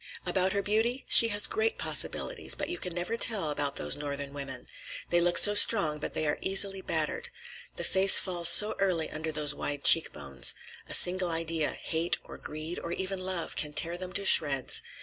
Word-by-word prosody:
"About 190 0 -2
her 200 0 -4
beauty? 225 +5 -3
She 230 - +7
has 205 -2 -2
great 440 +2 -2
possibilities, - - 0
but - - -7
you 350 - -6
can 180 -3 -7
never 180 +6 -5
tell 200 -10 +1
about 145 -1 -3
those - - 0
Northern 140 -1 -8
women. 135 -3 -8 0.5
They 175 0 +1
look 175 0 -1
so 205 - +6
strong, 170 -8 +3
but - - -8
they 155 - -4
are 150 - -4
easily 195 0 +1
battered. - - -4 0.5
The - - -7
face 190 +1 +5
falls 175 -2 +3
so 210 +4 +6
early 180 -5 -3
under 160 +1 -7
those 150 -2 0
wide 145 -1 -4
cheek 165 - +5
bones. 70 -4 -4 0.3
A - - +2
single 180 0 +5
idea—hate 165 0 -4
or - - -15
greed, 155 +3 -8
or 170 - -9
even 190 +1 -6
love—can 175 -5 -5
tear 170 +3 -2
them 180 0 -9
to 200 - -3
shreds. 135 -7 +3
175 Hz, 190 wpm, -26 LUFS, 150-195 Hz, 0.5 s, She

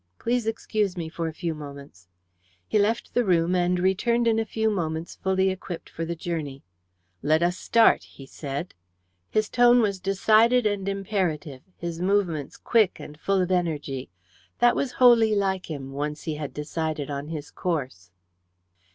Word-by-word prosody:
"Please 240 -1 -1
excuse 215 -3 -1
me 165 -2 -4
for 165 0 -3
a - - -3
few 165 +1 -3
moments." 140 - -11 0.6
He 215 - +2
left 220 +3 0
the 245 - +3
room, 175 -3 +2
and 180 0 +2
returned 235 +6 +2
in 225 -1 +3
a 225 - 0
few 220 -1 +1
moments 165 -4 -3
fully 190 0 +1
equipped 185 -2 -7
for 165 - -4
the 170 +1 -3
journey. 155 -5 -4 0.6
"Let 155 +4 +2
us 175 +1 +2
start," 230 +4 +4
he 135 - -13
said. 140 +4 -6 0.6
His 215 -1 +1
tone 245 +1 +5
was 200 -4 +1
decided 215 +5 +3
and 200 -2 0
imperative, 180 -9 -2 0.2
his 170 -1 -5
movements 180 -7 0
quick 220 -5 +2
and 150 - -9
full 195 +1 +1
of 180 - -3
energy. 150 -7 -1 0.5
That 240 0 +4
was 265 -3 -1
wholly 230 -4 +5
like 190 -3 -1
him, 135 -3 -6
once 150 +2 -4
he 160 - -2
had 150 -2 -5
decided 155 -1 -3
on 140 +1 -4
his 155 -2 -6
course. 130 - -3
180 Hz, 165 wpm, -25 LUFS, 150-210 Hz, 0.6 s, tone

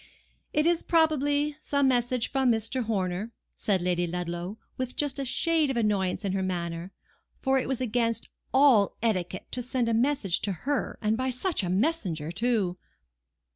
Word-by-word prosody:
"It 300 +1 +2
is, 340 0 +3
probably, 295 -2 +2
some 280 -2 +2
message 245 -1 +1
from 265 -2 +3
Mr. 225 +2 -1
Horner," 200 +1 -2 0.2
said 190 -4 0
Lady 175 -1 +1
Ludlow, 175 +3 -4 0.2
with 255 -1 -4
just 290 -2 0
a 275 - -2
shade 320 +3 +2
of 265 - -1
annoyance 205 -3 0
in 195 - 0
her 195 - 0
manner; 175 -1 -3 0.5
for 270 -1 +2
it - - -3
was 265 -2 -2
against 230 -1 0 0.2
all 260 -7 +5
etiquette 185 -5 -1
to 250 - -1
send 245 -1 -1
a 230 - +1
message 230 -6 +2
to 205 - -1
her, 285 -1 -1
and 215 +1 +2
by 260 +1 0
such 300 - -1
a 180 - -2
messenger 185 - 0
too! 200 -3 0
230 Hz, 170 wpm, -28 LUFS, 185-270 Hz, 0.5 s, all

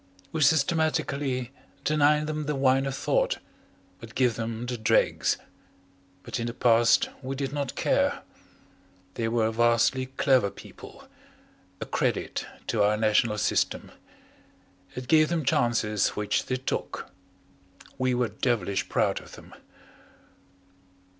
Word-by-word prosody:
We 160 - -2
systematically 140 -4 +1 0.3
deny 150 0 +3
them 155 -1 -3
the 150 - -1
wine 135 0 +2
of 135 - -3
thought, - - 0 0.6
but - - -12
give 125 -3 +3
them 115 +1 -4
the 125 0 -3
dregs. 110 -2 +2 0.9
But 125 - -4
in 115 - -2
the 120 - -5
past 115 -1 +4
we 135 0 -4
did 135 0 -3
not 140 -3 -3
care; - - +1 0.9
they 115 +2 -2
were 115 -1 +1
vastly 120 +3 +2
clever 130 -5 +2
people, - - -13 0.7
a - - -4
credit - - -2 0.2
to 115 - 0
our 105 +1 +3
national 110 0 +2
system. - - 0 1.0
It 125 0 -6
gave 155 +1 +5
them 165 -4 -1
chances 110 -4 +1
which 105 -1 -1
they 130 - 0
took. 130 - -4 0.9
We 130 -1 +1
were 120 -2 0
devilish 115 -6 -1
proud - - +1
of - - -15
them. - - -13
125 Hz, 125 wpm, -27 LUFS, 115-140 Hz, 1.0 s, gave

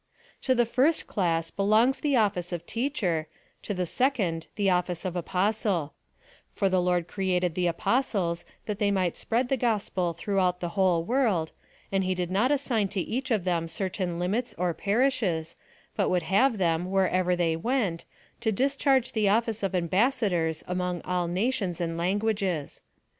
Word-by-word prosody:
To 260 - +2
the 240 -1 +3
first 270 +8 +2
class 165 -4 -1
belongs 220 +6 +3
the 285 -1 +1
office 195 -6 +1
of 170 -1 -4
Teacher, 200 - -1 0.3
to - - -5
the 180 -2 -1
second 190 - 0
the 200 -2 0
office 180 -1 0
of 180 -1 -3
Apostle 185 -2 0 0.2
;^ - - -39 0.4
for 195 -3 +2
the 185 -1 +2
Lord 175 -1 +1
created 180 -2 0
the 180 +1 0
Apos 240 +9 0
tles, 170 -3 -1 0.2
that 210 -2 -4
they 205 -2 +2
might 185 -4 0
spread 240 +3 0
the 270 - +1
gospel 205 -7 0
throughout 180 +1 0
the 175 - -3
whole 180 -3 +2
world, 210 -7 +1 0.4
and 195 -1 +1
he 185 0 0
did 180 -1 -3
not 210 +7 +2
assign 260 -7 +1
to 195 0 -3
each 260 +8 -2
of 215 -7 +1
them 170 -2 0
certain 185 -1 -3
limits 200 +8 -1
or 175 -1 0
parishes, 200 -7 0 0.4
but - - +1
would 180 -2 +1
have 215 +9 +3
them, 175 -1 0
wherever 185 -1 +2
they 170 -2 +1
went, 200 -3 -1 0.3
to 225 -2 0
discharge 270 +2 +2
the 215 -3 +2
office 225 +1 +1
of 195 -1 -1
ambassadors 180 - +1
among 180 -1 -2
all 180 -1 -1
nations 190 -1 -1
and 165 -1 -2
languages. 190 -3 -1
190 Hz, 170 wpm, -27 LUFS, 175-225 Hz, 0.4 s, the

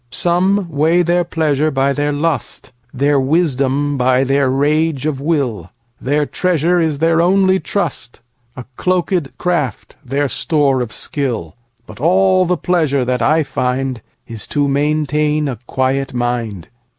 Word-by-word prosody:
Some 180 +7 +1
weigh 165 +3 +2
their 175 +1 +2
pleasure 155 -3 0
by 135 -1 +1
their 145 +1 -1
lust, 150 -1 -3 0.2
Their 140 +2 +1
wisdom 140 -1 0
by 130 +1 +3
their 135 0 +1
rage 145 +1 +1
of 145 -3 -2
will; 135 - -1 0.3
Their 145 +2 0
treasure 175 +1 +1
is 160 -3 0
their 165 +2 +2
only 190 +1 +3
trust,A 125 -9 -6
cloakèd 180 -4 -1
craft 170 -9 -2
their 140 +2 -1
store 140 -1 +1
of 120 -2 -4
skill; 120 - -4 0.3
But - - -13
all 185 +4 +3
the 180 0 +1
pleasure 155 -7 0
that 125 0 -1
I 160 +1 +3
findIs 125 -4 -4
to 145 -1 +1
maintain 150 +1 0
a 125 -6 -4
quiet 130 0 -1
mind. 120 -7 -3
145 Hz, 135 wpm, -17 LUFS, 130-165 Hz, 0.3 s, by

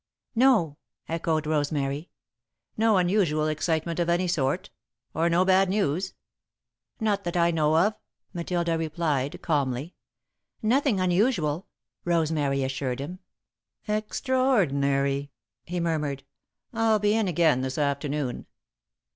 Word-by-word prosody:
"No," 225 - +3 0.3
echoed 160 -1 -1
Rosemary. 145 0 -1 0.7
"No 220 -2 +3
unusual 175 -5 +2
excitement 160 +2 -1
of 170 0 +1
any 175 +2 +2
sort? 170 +2 -1 0.4
Or 165 +2 +1
no 175 +2 +3
bad 190 0 +4
news?" 190 -2 -1 0.8
"Not 210 -3 0
that 175 0 -2
I 170 0 +3
know 155 -1 +2
of," 205 +6 +3 0.4
Matilda 170 -1 -1
replied, 155 -4 -1
calmly. 140 0 -1 0.7
"Nothing 250 -1 +2
unusual," 180 - +1 0.4
Rosemary 155 -5 +1
assured 130 -1 -2
him. 170 +7 -6 0.7
"Extraordinary!" 160 - +1 0.4
he 175 +1 -3
murmured. 150 -5 -1 0.5
"I'll 225 -1 +3
be 210 0 +2
in 220 -2 +1
again 160 -6 +3
this 130 0 -3
afternoon." 140 -2 -2
165 Hz, 110 wpm, -26 LUFS, 145-190 Hz, 0.8 s, bad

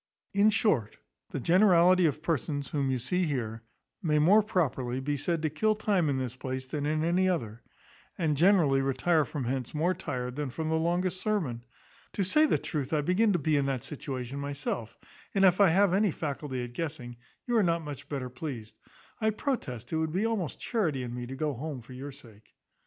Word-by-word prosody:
In 200 +2 +5
short, 180 - +1 0.3
the - - -4
generality 180 - +5
of 150 +1 -3
persons 145 -4 -1
whom 140 -2 0
you 130 - +1
see 180 +10 0
here 115 -7 -3 0.4
may 155 -5 +1
more 185 +9 +6
properly 135 - -1
be 145 +2 -1
said 160 +3 -1
to 155 - +2
kill 215 +8 +1
time 200 -7 +1
in 135 - 0
this 130 -2 -3
place 130 0 -4
than 145 +2 -3
in 155 +1 0
any 180 +3 +2
other; 115 - -2 0.6
and 155 -4 +1
generally 160 -5 +4
retire 140 +4 +2
from 140 +1 -4
hence 130 +2 -3
more 170 +5 +2
tired 125 -8 -4
than 145 -1 -3
from 155 +5 -3
the 160 - +1
longest 175 +3 0
sermon. 160 - -1 0.5
To 200 - 0
say 305 +12 +4
the - - +2
truth, 145 -2 -3
I 150 - +3
begin 185 +8 +3
to - - +3
be 155 -1 +1
in 140 -1 +2
that 130 -4 -2
situation 135 -2 -5
myself; 140 -5 -4 0.4
and 195 0 +5
if 185 +1 +5
I 195 - +7
have 190 +2 +4
any 205 +2 +3
faculty 145 -5 -4
at 120 0 -7
guessing, 130 -6 -5 0.3
you 240 - 0
are - - +5
not 170 -3 +1
much 145 -1 -8
better 130 -4 -4
pleased. 125 -5 -7 0.4
I 220 -1 +2
protest 205 - -3
it - - +2
would 160 0 -1
be 195 +5 +1
almost 220 -8 -2
charity 165 - -1
in 120 -1 -5
me 120 0 -5
to 135 - -6
go 150 +1 -1
home 135 -1 -6
for 130 - -12
your 135 +3 -7
sake." 115 -6 -15
150 Hz, 205 wpm, -29 LUFS, 130-180 Hz, 0.6 s, I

